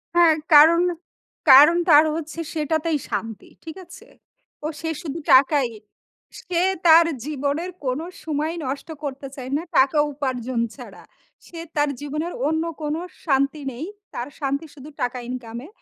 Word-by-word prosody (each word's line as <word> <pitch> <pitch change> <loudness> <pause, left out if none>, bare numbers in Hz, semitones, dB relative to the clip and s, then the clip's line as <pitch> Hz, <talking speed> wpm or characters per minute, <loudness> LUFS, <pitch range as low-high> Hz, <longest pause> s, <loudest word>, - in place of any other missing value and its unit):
হ্যাঁ, 335 -2 +6 0.2
কারণ, 320 +3 +8 0.7
কারণ 295 +6 +8
তার 300 0 +8
হচ্ছে 320 0 -6
সেটাতেই 315 +1 0
শান্তি। 225 -2 -5
ঠিক 320 - -8
আছে? - - -14 0.6
ও - - 0
সে 325 - -3
শুধু 325 -2 -5
টাকাই। 270 0 +4 0.7
সে 350 -1 -1 0.3
তার 330 +1 +8 0.2
জীবনের 295 +4 -2
কোন 255 +3 -1 0.2
সময় 310 +1 -2
নষ্ট 275 +4 -5
করতে 275 -1 -5
চায় 260 -1 -7
না, - - -3 0.2
টাকা 270 +3 +4 0.2
উপার্জন 255 -3 -3 0.2
ছাড়া। - - -12 0.4
সে 335 - -10 0.2
তার 295 -1 +2
জীবনের 305 +4 -4
অন্য 320 +1 0 0.2
কোন 300 0 -2 0.3
শান্তি 275 0 +1
নেই। 260 +6 -6 0.3
তার 240 - -4
শান্তি 280 +2 -2
শুধু 285 +1 -12
টাকা 245 +1 -1
ইনকাম 235 -2 -6
এ। - - -11
295 Hz, 145 wpm, -22 LUFS, 265-320 Hz, 0.7 s, কারণ